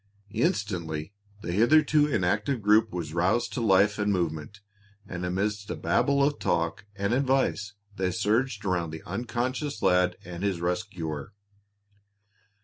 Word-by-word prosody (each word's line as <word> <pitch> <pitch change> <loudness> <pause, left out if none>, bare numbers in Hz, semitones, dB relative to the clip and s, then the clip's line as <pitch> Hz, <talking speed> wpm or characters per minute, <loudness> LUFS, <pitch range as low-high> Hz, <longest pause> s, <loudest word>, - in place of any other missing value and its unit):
Instantly 100 - -1 0.3
the - - -3
hitherto 150 - +4
inactive 105 +2 0
group 105 +1 +4
was 85 -4 -4
roused 95 +8 +1
to 125 - -2
life 105 0 +4
and 105 0 +1
movement, 85 +1 -2 0.5
and 90 -2 -5
amidst 100 +3 -2
a - - -2
Babel 140 +11 +2
of 145 +1 +1
talk - - -1
and 100 +2 -1
advice 130 -6 +1 0.2
they 95 -1 +1
surged 110 +3 0
around 85 -3 0
the 80 0 -8
unconscious 125 - -3
lad 90 0 +3
and 85 0 -7
his 100 -3 0
rescuer. 90 -2 -3
100 Hz, 135 wpm, -27 LUFS, 90-120 Hz, 0.5 s, hitherto